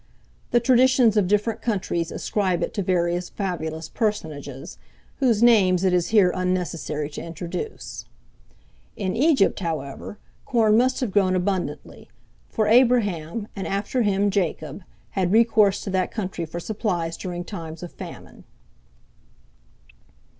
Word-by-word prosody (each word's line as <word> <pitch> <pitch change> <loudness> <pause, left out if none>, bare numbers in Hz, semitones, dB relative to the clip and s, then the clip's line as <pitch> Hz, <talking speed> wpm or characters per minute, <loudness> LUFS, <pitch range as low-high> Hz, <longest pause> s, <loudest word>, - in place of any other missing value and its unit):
The 240 - +4
traditions 250 -2 +4
of 205 -4 +3
different 210 +3 0
countries 175 -6 -1
ascribe 190 -4 -1
it - - -3
to 205 - -1
various 175 -1 0
fabulous 160 -5 -4
personages, 155 - -4 0.4
whose 235 -5 +2
names 190 -6 +5
it 185 -1 +3
is 175 -1 +2
here 205 -5 +4
unnecessary 180 -5 -2
to - - -6
introduce. 170 - -6 0.9
In 190 -3 -2
Egypt, 275 -3 +3
however, 160 +1 -5 0.3
corn 220 -4 +3
must 255 +3 +2
have 245 -6 -1
grown 190 -2 +3
abundantly; 185 0 -3 0.4
for 220 - 0
Abraham, 215 -5 +2
and 195 - -4
after 205 +6 -1
him 205 -1 +2
Jacob, 170 -4 -2 0.3
had 185 -2 0
recourse 215 -3 +4
to 195 - -4
that 185 -1 0
country 185 -5 -4
for 170 +2 -6
supplies 175 -4 -2
during 175 0 -5
times 165 -3 -8
of 175 - -7
famine. - - -11
190 Hz, 130 wpm, -24 LUFS, 175-220 Hz, 0.9 s, names